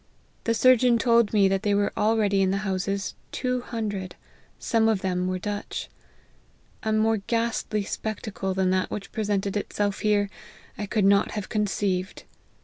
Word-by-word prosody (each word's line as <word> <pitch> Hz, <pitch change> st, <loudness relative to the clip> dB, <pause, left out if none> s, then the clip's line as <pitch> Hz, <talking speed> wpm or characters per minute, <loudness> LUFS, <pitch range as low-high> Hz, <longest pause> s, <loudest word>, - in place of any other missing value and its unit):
The 230 Hz, -, +2 dB
surgeon 250 Hz, 0 st, +5 dB
told 235 Hz, -2 st, +3 dB
me 205 Hz, -3 st, +4 dB
that 195 Hz, 0 st, +1 dB
there 205 Hz, -2 st, +2 dB
were 205 Hz, 0 st, +1 dB
already 210 Hz, -2 st, +2 dB
in 190 Hz, -, +3 dB
the 195 Hz, +2 st, -1 dB
houses 195 Hz, +1 st, -2 dB, 0.2 s
two 250 Hz, -1 st, -1 dB
hundred, 205 Hz, -6 st, -4 dB, 0.4 s
some 225 Hz, -1 st, +2 dB
of 210 Hz, -3 st, 0 dB
whom 180 Hz, -1 st, 0 dB
were 185 Hz, 0 st, -1 dB
Dutch. 205 Hz, +2 st, -5 dB, 0.9 s
A 220 Hz, -, -1 dB
more 220 Hz, +1 st, +3 dB
ghastly 230 Hz, 0 st, -1 dB
spectacle 200 Hz, -2 st, -4 dB
than 190 Hz, -1 st, +2 dB
that 185 Hz, 0 st, +1 dB
which 200 Hz, -, -6 dB
present 205 Hz, -3 st, -1 dB
ed 200 Hz, -, -3 dB
itself 205 Hz, -1 st, -1 dB
here, 205 Hz, -1 st, +2 dB, 0.5 s
I 205 Hz, -, -4 dB
could 210 Hz, -1 st, +1 dB
not 200 Hz, +1 st, +4 dB
have 210 Hz, -2 st, -4 dB
conceived. 195 Hz, -3 st, -1 dB
205 Hz, 160 wpm, -26 LUFS, 195-220 Hz, 0.9 s, surgeon